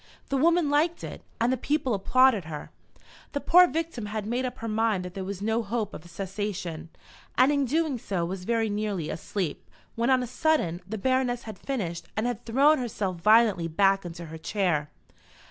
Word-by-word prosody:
The 275 - +1
woman 335 +1 +3
liked 320 +4 +1
it, - - -7 0.2
and 235 +3 +2
the - - 0
people 265 -1 0
applauded 225 0 +3
her. 155 -2 -7 0.6
The 285 - 0
poor 360 +4 +6
victim 325 -10 -3
had 215 0 -4
made 245 +4 -1
up 250 - -4
her 230 - -5
mind 215 -4 +1
that 180 - -7
there 190 - -5
was 195 +1 -5
no 225 +2 +1
hope 215 -1 -3
of - - -8
cessation, 185 -3 -4 0.5
and 255 +3 +6
in 280 -1 +2
doing 300 -1 0
so 185 -6 -2
was 185 +1 -5
very 225 +2 +1
nearly 205 -6 -2
asleep, 175 -1 -4 0.2
when, 235 +2 0
on 260 -1 +4
a - - -2
sudden, 245 - 0
the 220 +2 -4
Baroness 250 +1 0
had 215 -4 -9
finished 185 -11 -4
and 215 - +1
had 245 -2 -3
thrown 280 +6 +4
herself 205 -7 -3
violently 210 -2 +4
back 195 +4 +3
into 170 -1 -7
her 160 0 -9
chair. 170 -6 0
220 Hz, 190 wpm, -27 LUFS, 185-260 Hz, 0.6 s, poor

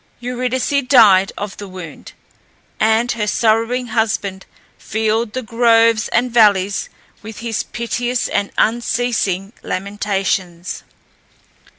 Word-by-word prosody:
Eurydice 250 +2 -2
died 200 -7 +6
of 205 -1 -5
the 205 - -8
wound, 185 -4 -10 0.7
and 220 +2 +2
her 215 -3 -2
sorrowing 230 +3 +1
husband 215 -4 -1 0.3
filled 220 +1 -1
the 255 - -3
groves 230 -1 +3
and 245 +1 0
valleys 205 -4 +3 0.3
with 215 0 -10
his 230 -2 -2
piteous 240 +1 -2
and 200 - -1
unceasing 225 -4 0
lamentations. 190 -3 -3
220 Hz, 100 wpm, -18 LUFS, 200-235 Hz, 0.7 s, died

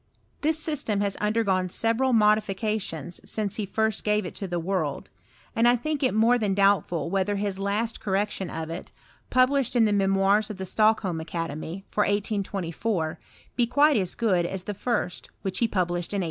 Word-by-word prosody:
This 310 +1 +1
system 295 -10 -1
has 200 -1 0
undei^oae 200 -4 +1
several 230 +6 +2
modificationg 210 - +1
since 210 -3 -3
he 210 -3 -2
first 220 +2 0
gave 210 -1 +1
it - - -6
to 195 - -5
the 175 -1 -2
world; 165 -5 -2 0.4
and 230 +1 +4
1 245 +1 +5
think 305 +4 -2
it 255 -5 +1
more 235 +3 +4
than 205 -3 0
doubtful 190 -5 +2
whether 195 +1 +1
his 200 -1 -2
last 210 +3 -1
cor 195 - -2
rection 195 -2 -1
of 160 0 -5
it, 170 - -7 0.4
publislied 255 0 +3
in 235 -2 +5
the 210 - +2
Memoirs 195 +1 +3
of 210 - -6
the 190 - -4
Stock 215 +3 +3
holm 180 -5 -2
Academy, 165 +2 -5
for 210 - +1
1824, 200 -4 -1 0.4
be 240 -1 +2
quite 290 +4 +4
as 185 -5 0
good 195 -7 +2
as 190 0 -5
the 205 - -4
first, 205 -3 -2 0.2
wbich 190 -1 -1
he 235 - +3
published 175 -3 -1
in - - 0
1815. - - 0
205 Hz, 190 wpm, -26 LUFS, 185-225 Hz, 0.4 s, 1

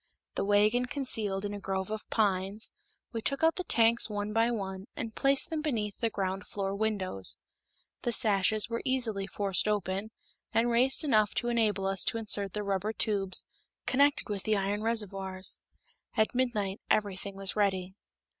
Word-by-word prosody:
The - - -1
wagon 210 +5 +3
concealed 220 -8 0
in 205 - -3
a 205 - -5
grove 190 0 -3
of 215 0 -5
pines, 200 0 +1 0.4
we 225 - -3
took 275 +6 0
out 325 0 +5
the 365 - -3
tanks 230 -6 +4
one 205 0 -3
by 225 +1 +3
one, 195 -3 -4
and 225 -1 -5
placed 275 +6 +4
them 315 -1 -1
beneath 220 -9 -2
the 230 - +1
ground 195 -2 -3
floor 195 -1 -3
windows. 200 - 0 0.6
The 240 - -1
sashes 215 -1 +2
were 230 0 -3
easily 235 -7 -1
forced 200 -1 0
open, 200 0 -1 0.4
and 235 +1 +2
raised 255 +6 +3
enough 215 -8 +2
to 240 - 0
enable 215 -4 +1
us 195 -1 0
to - - +1
insert 205 -3 +2
the 210 - -3
rubber 200 +2 -1
tubes 195 -4 +1 0.4
connected 285 +2 +3
with 205 -2 -3
the 215 +1 +1
iron 200 +2 -1
reservoirs. 195 -4 -2 0.6
At 220 0 +2
midnight 215 -6 -1
everything 200 -1 0
was 195 0 -1
ready. 190 -3 0
210 Hz, 165 wpm, -30 LUFS, 195-230 Hz, 0.6 s, out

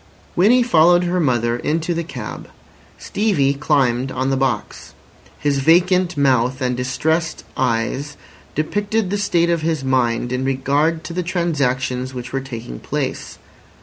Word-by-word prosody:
Winnie 235 +8 +5
followed 175 -4 +5
her 180 +1 0
mother 120 -6 +1
into 165 +6 -1
the 170 0 -2
cab. 165 - -7 0.5
Stevie 185 -11 +1
climbed 135 -3 +1
on 130 +1 -1
the - - +2
box. 130 -5 -3 0.4
His 145 -2 0
vacant 180 +3 +3
mouth 130 -2 +2
and 125 -2 0
distressed 155 +6 -1
eyes 130 +4 -1 0.4
depicted 205 +5 -1
the 205 - 0
state 170 -4 +2
of 170 -1 0
his 160 -3 -1
mind 125 -2 0
in 125 +1 -1
regard 140 +5 0
to 170 - -7
the 180 - -1
transactions 135 -7 -1
which 125 0 -7
were 135 - -1
taking 115 - -7
place. - - -4
140 Hz, 145 wpm, -20 LUFS, 130-170 Hz, 0.5 s, Winnie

